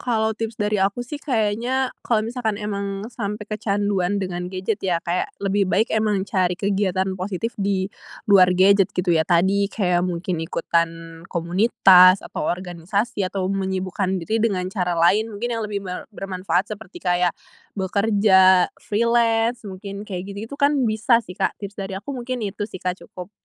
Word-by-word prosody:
Kalau 220 -2 0
tips 225 0 -5
dari 210 -1 0
aku 200 +5 0
sih, 290 +4 -7
kayaknya 245 +1 0
kalau 220 -2 0
misalnya 220 -3 -3
emang 200 -1 -3
sampai 210 -2 -4
kecanduan 205 -2 -1
dengan 180 -2 -3
gadget 190 +3 -3
ya, 180 -3 +1
kayak 175 +1 -1 0.2
lebih 195 -1 +1
baik 215 +4 +1
emang 210 -3 +1
cari 185 -3 0
kegiatan 190 -1 0
positif 195 +5 -3
di 195 -1 0 0.4
luar 190 -3 +6
gadget 195 0 +5
gitu 180 -1 +1
ya. 160 +1 +1
Tadi, 190 +3 +3
kayak 180 -5 +1
mungkin 175 -1 -3
ikutan 165 0 -2
komunitas, 185 +1 +5
atau - - -4
organisasi, 185 +5 -2
atau 190 -1 -3
menyibukkan 190 0 -1
diri 220 +3 0
dengan 200 -5 0
cara 180 -3 -1
lain 205 +7 +3
mungkin 240 +3 -3
yang 225 -1 -2
lebih 200 -1 -4
ber 180 -1 -6
bermanfaat, 190 0 -2
seperti 205 -2 -10
kayak 180 -1 +1 0.4
bekerja, 190 -2 +4
freelance 230 +1 +1
mungkin, 200 +2 -8
kayak 190 +1 -5
gitu-gitu 220 +7 -7
kan 285 -1 +2
bisa 220 +2 +3
sih, 185 -5 -11
Kak. 195 - -1
Tips 200 0 -7
dari 195 -1 -5
aku 205 - -18
mungkin 250 0 -4
itu 205 0 -3
sih, 185 -3 -9
Kak, 180 0 -2
cukup. 180 +1 -10
200 Hz, 160 wpm, -22 LUFS, 185-215 Hz, 0.4 s, luar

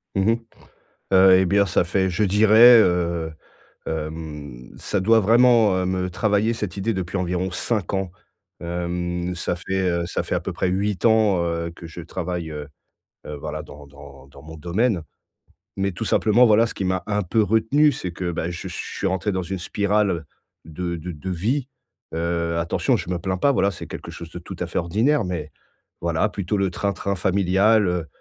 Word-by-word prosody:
Mmh 95 +3 +3
mh. 115 - +1 0.8
Heu 95 0 +7
et 95 - +3
bien 100 +2 +3
ça 90 - +1
fait, 95 +1 +1
je 100 +4 0
dirais, 110 +4 +7
heu, 85 -3 0 0.6
hem, 75 -5 -6
ça 100 - -2
doit 115 +4 +4
vraiment, 115 -1 +5
heu, 95 - 0
me 90 0 -1
travailler 105 +4 +1
cette 105 -4 -5
idée 110 +3 -1
depuis 95 0 -3
environ 90 0 -1
5 100 +1 -2
ans. 95 -2 -2 0.5
Hem, 85 +1 -3
ça 90 - -2
fait, 95 +1 -1
heu, 85 -1 -1
ça - - -2
fait - - -2
à - - -1
peu - - -5
près 95 - -1
8 100 +3 -1
ans, 110 -5 +4
heu, 85 0 -2
que 85 - -10
je 85 - -9
travaille, 85 -1 -4
heu, 75 -1 -7 0.6
voilà, 75 +1 -6
dans 70 0 -13
dans 70 -1 -14
dans 70 0 -15
mon 80 +1 -10
domaine. 90 +4 0 0.8
Mais 100 0 0
tout 95 +5 -5
simplement, 115 +5 +4
voilà, 110 +1 +5
ce - - -7
qui 95 - -3
m'a 95 0 -1
un 105 0 0
peu 105 +5 +1
retenu, 115 +8 +3
c'est 95 -9 -5
que, 85 0 -3
bah, 80 +1 -3
je 85 - -6
suis - - -5
rentré 95 +2 -1
dans 95 -1 -1
une 95 +1 -5
spirale 100 -3 0 0.4
de 85 +2 -4
de 85 +2 -6
de 85 +4 -7
vie. 120 - -1 0.5
Heu, 85 0 -1
attention, 85 - +1
je - - -6
me 90 - -1
plains 95 +1 -2
pas, 140 +8 +3
voilà, 100 -6 +2
c'est 85 - -9
quelque - - -8
chose 85 -1 -9
de 90 - -7
tout - - -9
à - - -2
fait - - -2
ordinaire. 110 - +1
Mais 80 -5 -4 0.5
voilà, 85 +4 +1
plutôt 100 0 -3
le 95 -1 +1
train-train 100 +1 -2
familial, 95 +3 +3
heu, 90 -2 -2
90 Hz, 190 wpm, -23 LUFS, 85-105 Hz, 0.8 s, Heu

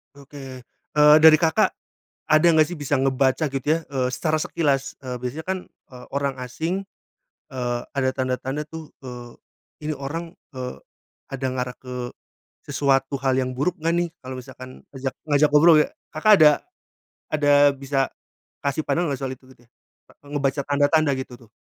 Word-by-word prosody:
Oke, 140 -2 -10 0.3
eee, 150 0 +7
dari 155 -1 +9
Kakak, 160 -2 +3 0.6
ada 155 +2 +5
gak 155 - +7
sih 170 +1 -7
bisa 145 0 0
ngebaca 135 +2 +1
gitu 135 +1 -4
ya, - - -2
eee, 130 -2 0
secara 155 +5 -1
sekilas, 150 -5 -1
eee, 125 -1 -5
biasanya 125 +6 -5
kan, 190 +2 -2
eee, 125 -1 -15
orang 140 -1 0
asing, 165 +10 -3 0.7
eee, 120 -2 -2
ada 135 -2 +1
tanda-tanda 130 +2 -3
tuh, 160 0 -9 0.2
eee, 120 -1 -9 0.5
ini 155 - -1
orang, 160 +4 -6 0.2
eee, 125 0 -6 0.5
ada 135 0 -4
ngarah 125 0 -4
ke, 125 -1 -6 0.6
sesuatu 135 -1 +1
hal 135 -1 +2
yang 130 -1 -1
buruk 150 +7 +1
gak 165 - +1
nih 175 0 0
kalau 130 0 -7
misalkan 130 +1 -11
ngajak 135 -1 -4
ngajak 150 0 +3
ngobrol 160 +2 +7
ya - - 0 0.3
Kakak 185 +8 +5
ada, 155 - +10 0.8
ada 145 -2 +1 0.2
bisa, 135 0 -1 0.6
kasih 140 +2 -1
pandangan 170 -3 0
gak 135 - -3
soal 135 -1 -3
itu 130 - -25
gitu? 120 - -21 0.6
Ngebaca 140 -1 -1
tanda-tanda 145 +1 +3
gitu 130 -1 -7
tuh? 115 -3 -19
140 Hz, 160 wpm, -23 LUFS, 130-155 Hz, 0.8 s, ada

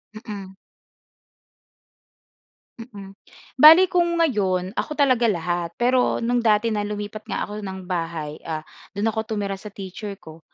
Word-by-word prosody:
Mm. 200 -3 -8 2.3
Mm. 205 -5 -10 0.5
Bale 320 +6 +10
kung 345 -1 +2
ngayon 195 - +1
ako - - -2
talaga 255 -5 +3
lahat. 175 -3 -2
Pero 250 +1 +2
no'ng 245 +1 +1
dati 220 0 +3
na 205 -1 -1
lumipat 210 +1 -6
nga - - -2
ako 210 +1 -6
ng 190 -2 -6
bahay, 165 -4 -4
ah, 155 -1 -3 0.3
do'n 210 +3 0
ako 220 0 -3
tumira 200 -2 -3
sa 210 - -10
teacher 200 +1 -7
ko, 160 -4 -13
205 Hz, 135 wpm, -23 LUFS, 185-230 Hz, 2.3 s, Bale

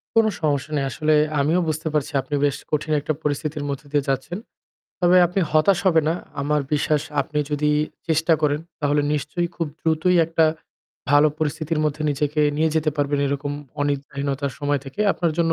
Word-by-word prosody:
কোন 225 0 +5 0.2
সমস্যা 145 -1 0
নেই। 140 - 0
আসলে 155 +4 +1 0.3
আমিও 155 +5 +2
বুঝতে 155 +1 -2
পারছি, 150 -1 0
আপনি 135 +3 -4
বেশ 140 - +1 0.2
কঠিন 155 +1 -1
একটা 150 +2 -2
পরিস্থিতির 150 0 -2
মধ্য 140 -1 -3
দিয়ে 145 -2 +2
যাচ্ছেন। 135 +6 -2 0.6
তবে 180 0 +5
আপনি 180 +3 -1
হতাশ 155 +5 +4
হবেন 165 -4 +4
না। 165 - +2 0.3
আমার 150 +1 +1
বিশ্বাস 150 0 +1 0.2
আপনি 150 +2 -3
যদি 150 0 +1 0.4
চেষ্টা 160 +1 +2
করেন, 150 0 +2 0.2
তাহলে 145 0 +2
নিশ্চয়ই 150 +4 -1
খুব 165 - -1
দ্রুতই 160 +3 +2
একটা 165 0 +2 0.7
ভালো 145 +1 +6
পরিস্থিতির 155 +1 -1
মধ্যে 150 +1 -1
নিজেকে 150 +1 0 0.2
নিয়ে 160 0 +2
যেতে 155 -1 +2
পারবেন 145 0 0
এরকম 140 +1 -2 0.3
অনিদ্রাহীনতার 140 -1 -2
সময় 145 -1 0
থেকে। 135 +9 -7
আপনার 170 -3 -1
জন্য 165 -1 +3
150 Hz, 170 wpm, -22 LUFS, 145-160 Hz, 0.7 s, ভালো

